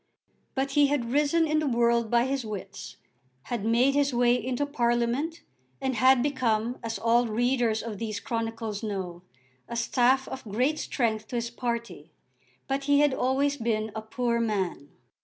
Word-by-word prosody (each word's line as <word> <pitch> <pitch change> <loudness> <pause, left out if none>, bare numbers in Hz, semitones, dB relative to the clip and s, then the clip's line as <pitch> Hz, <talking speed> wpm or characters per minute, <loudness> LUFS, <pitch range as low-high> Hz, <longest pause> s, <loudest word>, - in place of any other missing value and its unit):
But 270 0 -1
he 290 +1 +4
had 265 -5 -1
risen 295 +4 +3
in 310 0 +2
the 305 - -1
world 235 -2 +2
by 235 +1 +3
his 270 -1 -1
wits, 210 -3 -7 0.5
had 235 -4 -4
made 235 +5 +3
his 280 -2 +1
way 240 0 +4
into 250 +3 -1
Parliament, 245 +4 0 0.4
and 265 0 -1
had 255 +2 +4
become, 245 -4 0
as 225 -1 -3
all 235 +1 +3
readers 235 0 +1
of 220 -4 -6
these 215 -3 -3
chronicles 225 -2 -3
know, 190 -5 -4 0.5
a 235 - -4
staff 250 +3 +2
of 265 - -7
great 250 +9 0
strength 220 -4 -1
to - - -6
his 235 0 -2
party. 235 -1 -4 0.6
But 275 0 -2
he 285 0 +4
had 295 -2 +3
always 275 +3 +1
been 220 -3 -1
a 220 - -3
poor 235 +1 -1
man. 190 -10 -2
240 Hz, 165 wpm, -27 LUFS, 225-270 Hz, 0.6 s, he